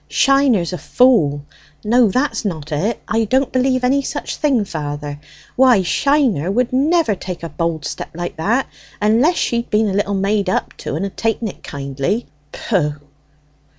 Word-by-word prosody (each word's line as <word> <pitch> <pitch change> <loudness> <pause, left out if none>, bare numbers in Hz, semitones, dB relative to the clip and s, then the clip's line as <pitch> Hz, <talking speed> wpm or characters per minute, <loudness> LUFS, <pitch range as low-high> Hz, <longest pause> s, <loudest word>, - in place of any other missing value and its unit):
"Shiner's 270 -11 +3
a 180 - -4
fool! 155 - +3 0.4
no, 235 +1 +4
that's 255 +8 0
not 160 -6 -4
it; 195 +10 -1
I 225 +1 +1
don't 260 +5 +1
believe 255 0 +1
any 270 +3 +3
such - - -4
thing, 270 -8 +1
father. 145 -3 -5 0.4
Why, 250 -6 +5
Shiner 250 - +1
would 245 +5 0
never 300 -1 +2
take 180 -2 -7
a 165 - -4
bold 160 0 -2
step - - -5
like 175 -1 -5
that, 225 +11 +1 0.3
unless 230 +11 +3
she'd 235 -5 -1
been 210 0 +2
a - - -2
little 200 0 0
made 200 0 0
up - - -1
to, - - -5
and 175 +5 -2
had 195 - -7
taken 225 0 -1
it - - -12
kindly. 140 - -3 0.3
Pooh!" 155 -9 -1
210 Hz, 165 wpm, -18 LUFS, 170-255 Hz, 0.4 s, Why